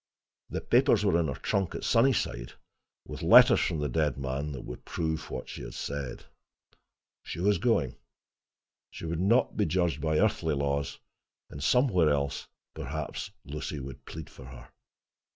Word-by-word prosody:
The -, -, -3 dB
papers 120 Hz, -4 st, +3 dB
were 90 Hz, -4 st, +3 dB
in 80 Hz, -, +1 dB
her 70 Hz, -, -3 dB
trunk 95 Hz, -3 st, -1 dB
at -, -, -5 dB
Sunnyside, 115 Hz, -, +1 dB, 0.5 s
with -, -, -7 dB
letters -, -, +8 dB
from -, -, 0 dB
the 75 Hz, -, 0 dB
dead 75 Hz, +1 st, 0 dB
man 70 Hz, +2 st, -3 dB
that 65 Hz, -, -7 dB
would -, -, -8 dB
prove 80 Hz, -1 st, -3 dB
what 65 Hz, -, -5 dB
she -, -, -7 dB
said. 70 Hz, -3 st, -5 dB, 1.0 s
She -, -, -7 dB
was 100 Hz, +3 st, +2 dB
going; 115 Hz, -, +1 dB, 0.9 s
she -, -, -8 dB
would 80 Hz, 0 st, -2 dB
not 115 Hz, +7 st, +3 dB
be 105 Hz, -, +2 dB
judged 85 Hz, -5 st, 0 dB
by 80 Hz, +1 st, +1 dB
earthly 80 Hz, -6 st, +2 dB
laws; 70 Hz, 0 st, -1 dB, 0.5 s
and 70 Hz, -, -8 dB
somewhere 90 Hz, -, +3 dB
else 70 Hz, -1 st, -1 dB, 0.3 s
perhaps 75 Hz, -2 st, -5 dB, 0.2 s
Lucy 75 Hz, 0 st, -5 dB
would 65 Hz, -1 st, -9 dB
plead 80 Hz, 0 st, -8 dB
for 65 Hz, -, -13 dB
her. 65 Hz, -1 st, -12 dB
75 Hz, 155 wpm, -29 LUFS, 70-95 Hz, 1.0 s, letters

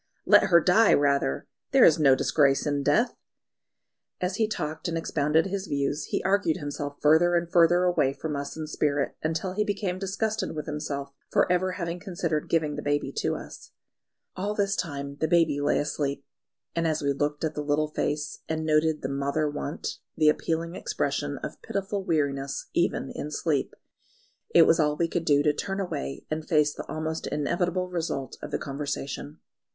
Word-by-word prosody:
"Let -, -, +6 dB
her 170 Hz, -3 st, +6 dB
die 195 Hz, +6 st, +5 dB
rather! 140 Hz, -, +1 dB, 0.3 s
There -, -, +8 dB
is 160 Hz, -, +5 dB
no 135 Hz, -3 st, +6 dB
disgrace 140 Hz, 0 st, +2 dB
in 145 Hz, -1 st, 0 dB
death." 225 Hz, -, +2 dB, 1.1 s
As 185 Hz, +2 st, -2 dB
he 220 Hz, -, +2 dB
talked 155 Hz, -4 st, -4 dB
and 165 Hz, -1 st, -1 dB
expounded 160 Hz, 0 st, +1 dB
his 195 Hz, 0 st, -3 dB
views, 140 Hz, +1 st, -1 dB
he -, -, -2 dB
argued 190 Hz, -4 st, +2 dB
himself 145 Hz, -1 st, -5 dB
further 160 Hz, +4 st, +4 dB
and 170 Hz, 0 st, 0 dB
further 175 Hz, +1 st, +5 dB
away 175 Hz, -7 st, +2 dB
from 155 Hz, +1 st, -4 dB
us 140 Hz, +2 st, -5 dB
in 155 Hz, -, -4 dB
spirit, 145 Hz, -2 st, -1 dB
until 165 Hz, +4 st, -2 dB
he 210 Hz, +2 st, +1 dB
became 200 Hz, -3 st, -2 dB
disgusted 210 Hz, 0 st, -2 dB
with 150 Hz, -, -4 dB
himself 145 Hz, -2 st, -4 dB, 0.2 s
for -, -, +3 dB
ever 180 Hz, +1 st, +1 dB
having 170 Hz, -1 st, -4 dB
considered 170 Hz, -5 st, -2 dB
giving 155 Hz, -3 st, +1 dB
the -, -, -3 dB
baby 145 Hz, 0 st, -1 dB
to -, -, 0 dB
us. -, -, -10 dB, 0.6 s
All 205 Hz, +3 st, -2 dB
this 200 Hz, -1 st, +1 dB
time 140 Hz, -4 st, -4 dB
the 160 Hz, -, 0 dB
baby 160 Hz, -3 st, +3 dB
lay 145 Hz, -, +2 dB
asleep; 140 Hz, -1 st, -2 dB, 0.5 s
and 165 Hz, 0 st, +1 dB
as 155 Hz, -2 st, -1 dB
we 140 Hz, 0 st, +2 dB
looked 145 Hz, +2 st, -2 dB
at 155 Hz, -1 st, 0 dB
the 150 Hz, -, -3 dB
little 150 Hz, +1 st, +1 dB
face 150 Hz, 0 st, -2 dB
and 160 Hz, 0 st, -2 dB
noted 155 Hz, 0 st, +2 dB
the -, -, 0 dB
"mother 140 Hz, +3 st, 0 dB
want," 145 Hz, 0 st, -4 dB, 0.2 s
the 155 Hz, -1 st, +5 dB
appealing 165 Hz, +2 st, -1 dB
expression 145 Hz, -3 st, -2 dB
of -, -, -6 dB
pitiful 200 Hz, 0 st, -3 dB
weariness 140 Hz, -5 st, -1 dB
even -, -, 0 dB
in 150 Hz, -, -5 dB
sleep, 150 Hz, -1 st, -1 dB, 0.7 s
it -, -, +7 dB
was 165 Hz, -, +4 dB
all 150 Hz, -1 st, +2 dB
we 170 Hz, -, +1 dB
could 165 Hz, 0 st, -2 dB
do 145 Hz, -2 st, +4 dB
to 150 Hz, -, +3 dB
turn 195 Hz, +6 st, -3 dB
away 70 Hz, -, -4 dB
and 155 Hz, 0 st, -3 dB
face 150 Hz, -2 st, +3 dB
the -, -, -8 dB
almost 160 Hz, +1 st, -3 dB
inevitable 175 Hz, +4 st, -1 dB
result 165 Hz, -7 st, -3 dB
of -, -, -6 dB
the -, -, -1 dB
conversation. 140 Hz, +1 st, -5 dB
155 Hz, 180 wpm, -27 LUFS, 145-175 Hz, 1.1 s, There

